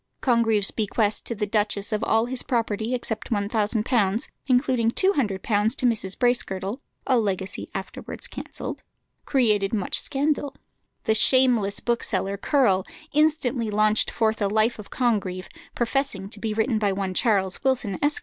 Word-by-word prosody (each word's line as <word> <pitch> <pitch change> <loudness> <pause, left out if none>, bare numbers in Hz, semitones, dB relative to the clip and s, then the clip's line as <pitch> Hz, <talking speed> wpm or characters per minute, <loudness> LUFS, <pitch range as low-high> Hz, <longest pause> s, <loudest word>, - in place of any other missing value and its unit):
Congreve's 225 -5 +2
bequest 215 -1 0
to 235 - 0
the 210 0 -1
duchess 205 -1 -1
of 215 0 -1
all 225 +1 +2
his 250 +1 0
property, 230 -1 -1
except 225 -3 -3
£1000, 215 0 0 0.2
including 250 -3 +2
£200 - - -6
to 385 +1 +4 0.7
Mrs. 215 -5 0
Bracegirdle 235 -3 0 0.3
(a 255 -3 +3
legacy 195 -3 -3
afterwards - - -6
cancelled), - - -7 0.4
created 215 -6 +2
much 195 -4 +1
scandal. 285 0 -1 0.5
The 220 - +2
shameless 230 -3 +3
bookseller, 200 -5 -1
Curll, 200 -5 +2 0.3
instantly 285 -6 +1
launched 215 +1 +3
forth 220 -1 0
a 200 - +2
life 220 +3 +1
of 210 - -10
Congreve, 195 -7 -1 0.3
professing 240 -5 -2
to 210 - -4
be 220 +1 -2
written 220 0 +1
by 205 -2 +1
one 190 -1 -2
Charles 190 -3 +1
Wilson, 250 -7 0
Esq. 295 +1 +3
220 Hz, 140 wpm, -24 LUFS, 200-245 Hz, 0.7 s, to